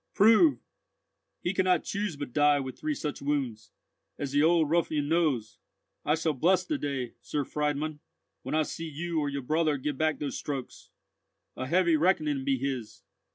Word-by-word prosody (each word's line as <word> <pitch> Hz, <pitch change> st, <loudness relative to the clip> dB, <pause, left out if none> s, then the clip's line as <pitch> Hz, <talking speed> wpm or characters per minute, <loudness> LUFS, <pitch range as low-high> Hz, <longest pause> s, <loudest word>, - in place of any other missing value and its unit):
"Prove! 225 Hz, -, +6 dB, 0.9 s
He 175 Hz, -, 0 dB
could 190 Hz, -1 st, +1 dB
not 180 Hz, -3 st, +3 dB
choose 200 Hz, -4 st, -3 dB
but 145 Hz, -4 st, -6 dB
die 145 Hz, -1 st, +4 dB
with 130 Hz, -1 st, -5 dB
three 310 Hz, -1 st, -1 dB
such 150 Hz, -, -4 dB
wounds, 135 Hz, -7 st, -2 dB, 0.5 s
as 140 Hz, -2 st, -4 dB
the 145 Hz, +1 st, +3 dB
old 160 Hz, 0 st, +4 dB
ruffian 155 Hz, -2 st, +1 dB
knows. 155 Hz, -9 st, 0 dB, 0.4 s
I 150 Hz, -, +2 dB
shall 160 Hz, -1 st, 0 dB
bless 180 Hz, +7 st, +2 dB
the 305 Hz, -, -2 dB
day, 135 Hz, -4 st, -3 dB
Sir 145 Hz, -2 st, -2 dB
Friedmund, 150 Hz, 0 st, -2 dB, 0.4 s
when -, -, -3 dB
I 155 Hz, -, +3 dB
see 165 Hz, +2 st, -5 dB
you 165 Hz, +2 st, -2 dB
or 145 Hz, -1 st, 0 dB
your 140 Hz, -1 st, -4 dB
brother 155 Hz, +2 st, +1 dB
give 140 Hz, +1 st, -3 dB
back 155 Hz, -2 st, +1 dB
those 145 Hz, -2 st, -4 dB
strokes! 140 Hz, -3 st, -6 dB, 0.7 s
A 130 Hz, -, -4 dB
heavy 170 Hz, +1 st, +3 dB
reckoning 155 Hz, -5 st, +1 dB
be 135 Hz, 0 st, +1 dB
his." 130 Hz, -4 st, -4 dB
150 Hz, 175 wpm, -28 LUFS, 140-170 Hz, 0.9 s, Prove